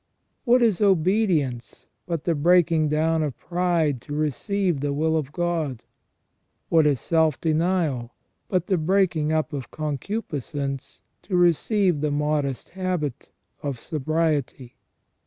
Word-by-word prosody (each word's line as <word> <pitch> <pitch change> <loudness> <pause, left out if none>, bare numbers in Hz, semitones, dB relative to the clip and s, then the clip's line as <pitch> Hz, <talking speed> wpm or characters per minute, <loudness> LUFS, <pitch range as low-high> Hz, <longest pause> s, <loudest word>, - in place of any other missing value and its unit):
What 245 0 +5
is 215 -6 +2
obedience 180 - +1 0.2
but 170 -4 -2
the 170 - +1
breaking 165 0 +3
down 160 +2 +1
of 150 -4 -3
pride 170 -7 0
to 145 - -6
receive 170 - -1
the 145 0 -1
will 160 +2 +1
of 150 -3 -2
God? 165 -7 -2 0.9
What 160 -2 +4
is 140 -4 +2
self 160 +1 +1
denial 160 -7 0 0.3
but 185 -2 0
the 190 -4 +1
breaking 165 -3 +1
up 155 0 0
of 135 -3 -5
concupiscence 145 - -4 0.2
to 195 - -3
receive 175 0 +2
the 150 - +1
modest 145 -3 -1
habit 175 -8 -3 0.3
of 140 -5 -4
sobriety 150 -3 -2
155 Hz, 125 wpm, -24 LUFS, 145-175 Hz, 0.9 s, What